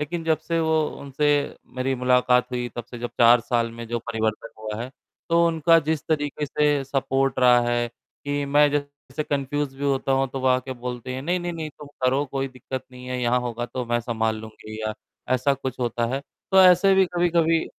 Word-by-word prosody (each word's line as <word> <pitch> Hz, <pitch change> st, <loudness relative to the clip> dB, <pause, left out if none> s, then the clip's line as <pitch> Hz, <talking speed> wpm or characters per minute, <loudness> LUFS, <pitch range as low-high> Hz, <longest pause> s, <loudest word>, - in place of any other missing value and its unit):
लेकिन 165 Hz, +3 st, -3 dB
जब 160 Hz, -1 st, +2 dB
से 165 Hz, -1 st, -2 dB
उनसे 150 Hz, -3 st, 0 dB, 0.5 s
मेरी 130 Hz, +1 st, 0 dB
मुलाकात 125 Hz, 0 st, +3 dB
हुई, 125 Hz, -1 st, -2 dB
तब 120 Hz, -, -4 dB
से 120 Hz, +1 st, -10 dB
जब 120 Hz, 0 st, -4 dB
4 120 Hz, +1 st, +7 dB
साल 115 Hz, 0 st, 0 dB
में 115 Hz, 0 st, -8 dB
जो 120 Hz, +1 st, -1 dB
परिवर्तन 110 Hz, -1 st, -2 dB
हुआ 110 Hz, 0 st, -5 dB
है, 125 Hz, -, -7 dB, 0.4 s
तो 170 Hz, 0 st, +4 dB
उनका 165 Hz, 0 st, +4 dB
जिस 160 Hz, -2 st, 0 dB
तरीके 145 Hz, -1 st, -1 dB
से 145 Hz, 0 st, +1 dB
सपोर्ट 135 Hz, -1 st, 0 dB
रहा 125 Hz, -1 st, +6 dB
है, 120 Hz, 0 st, 0 dB, 0.4 s
कि 145 Hz, 0 st, -1 dB
मैं 145 Hz, +1 st, +4 dB
जैसे 145 Hz, 0 st, -4 dB
कन्फ्यूज़ 145 Hz, -1 st, -2 dB
भी 140 Hz, -, -3 dB
होता 135 Hz, -1 st, +1 dB
हूँ, 135 Hz, 0 st, +2 dB
तो 135 Hz, +1 st, -5 dB
वो 130 Hz, -, -1 dB
आके 130 Hz, +1 st, +1 dB
बोलते 125 Hz, 0 st, -6 dB
हैं, 130 Hz, -, -5 dB
"नहीं, 175 Hz, +5 st, 0 dB
नहीं, 175 Hz, 0 st, -3 dB
नहीं, 160 Hz, -2 st, -5 dB
तुम 150 Hz, 0 st, -13 dB, 0.2 s
करो, 135 Hz, +3 st, +2 dB
कोई 135 Hz, 0 st, -3 dB
दिक्कत 130 Hz, 0 st, -7 dB
नहीं 125 Hz, 0 st, -11 dB
है, 125 Hz, 0 st, -3 dB
यहाँ 125 Hz, +1 st, +2 dB
होगा 120 Hz, -1 st, -4 dB
तो 125 Hz, +1 st, -4 dB
मैं 120 Hz, 0 st, +1 dB
सँभाल 110 Hz, -2 st, -1 dB
लूँगी।" 110 Hz, 0 st, -10 dB
या 110 Hz, 0 st, -2 dB, 0.4 s
ऐसा 130 Hz, +2 st, +2 dB
कुछ 130 Hz, -2 st, -5 dB
होता 120 Hz, -1 st, 0 dB
है, 135 Hz, -, -2 dB, 0.3 s
तो 190 Hz, -1 st, +6 dB
ऐसे 185 Hz, +1 st, +6 dB
भी 190 Hz, 0 st, +5 dB
कभी-कभी 170 Hz, -2 st, +2 dB
135 Hz, 205 wpm, -24 LUFS, 120-150 Hz, 0.5 s, 4